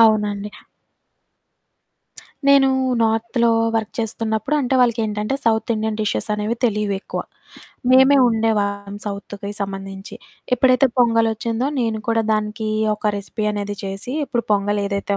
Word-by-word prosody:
అవునండి. 210 Hz, -2 st, +3 dB, 2.0 s
నేనూ 275 Hz, -1 st, +6 dB, 0.3 s
నార్త్‌లో 230 Hz, +1 st, +1 dB, 0.2 s
వర్క్ 220 Hz, -1 st, -1 dB
చేస్తున్నప్పుడు 225 Hz, +4 st, -1 dB
అంటే, 265 Hz, 0 st, 0 dB
వాళ్ళకేంటంటే 220 Hz, -1 st, +1 dB
సౌత్ 225 Hz, 0 st, +1 dB
ఇండియన్ 220 Hz, 0 st, -2 dB
డిషెస్సనేవి 210 Hz, +1 st, -1 dB
తెలీవెక్కువ. 210 Hz, -3 st, -1 dB, 0.7 s
మేమే 265 Hz, +2 st, +6 dB
ఒండేవాళ్ళం 205 Hz, -3 st, -1 dB
సౌత్‌వి 200 Hz, 0 st, -6 dB
సంబంధించి. 195 Hz, 0 st, -6 dB, 0.4 s
ఎప్పుడైతే 255 Hz, +1 st, +4 dB
పొంగలొచ్చిందో, 230 Hz, 0 st, +2 dB
నేను 225 Hz, -2 st, -1 dB
కూడా 225 Hz, 0 st, +2 dB
దానికీ 215 Hz, +1 st, -2 dB, 0.3 s
ఒక 210 Hz, -, -17 dB
రెసిపీ 205 Hz, +2 st, -5 dB
అనేది 205 Hz, 0 st, -4 dB
చేసి, 195 Hz, +5 st, -5 dB
ఇప్పుడు 240 Hz, -4 st, -2 dB
పొంగలేదైతే 200 Hz, 0 st, 0 dB
220 Hz, 105 wpm, -20 LUFS, 205-230 Hz, 2.0 s, నేనూ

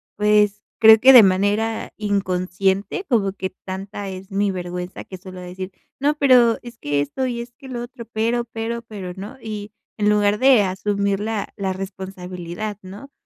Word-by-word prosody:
pues 210 Hz, 0 st, +3 dB, 0.2 s
creo 220 Hz, -1 st, +9 dB
que 265 Hz, +3 st, +8 dB
de 245 Hz, -, +11 dB
manera 205 Hz, +4 st, +1 dB
inconsciente 195 Hz, -, -1 dB
como 205 Hz, -7 st, +1 dB
que 190 Hz, -1 st, -4 dB
tanta 195 Hz, +1 st, -5 dB
es 190 Hz, +2 st, -9 dB
mi 200 Hz, +1 st, +1 dB
vergüenza 180 Hz, 0 st, -5 dB
que 185 Hz, -, -9 dB
suelo 185 Hz, 0 st, -10 dB
decir: 185 Hz, +1 st, -7 dB, 0.3 s
"No, 290 Hz, +2 st, +2 dB
pero 250 Hz, -5 st, +5 dB
es 240 Hz, -1 st, -11 dB
que 145 Hz, 0 st, 0 dB
esto 145 Hz, -, -2 dB
y 235 Hz, -1 st, -4 dB
que 270 Hz, -, -11 dB
lo 240 Hz, -2 st, -5 dB
otro, 240 Hz, -1 st, -9 dB
pero, 230 Hz, +2 st, 0 dB
pero, 230 Hz, +1 st, -4 dB
pero", 205 Hz, -6 st, -7 dB
¿no? 205 Hz, +8 st, -8 dB
Y 210 Hz, -3 st, -6 dB, 0.2 s
en 210 Hz, 0 st, +1 dB
lugar 210 Hz, 0 st, +3 dB
de 260 Hz, -5 st, +6 dB
asumir 200 Hz, +1 st, -1 dB
la 215 Hz, -1 st, -3 dB
la 195 Hz, -2 st, -2 dB
responsabilidad, 190 Hz, +1 st, -6 dB
¿no? 205 Hz, +9 st, -11 dB
205 Hz, 170 wpm, -21 LUFS, 190-225 Hz, 0.3 s, de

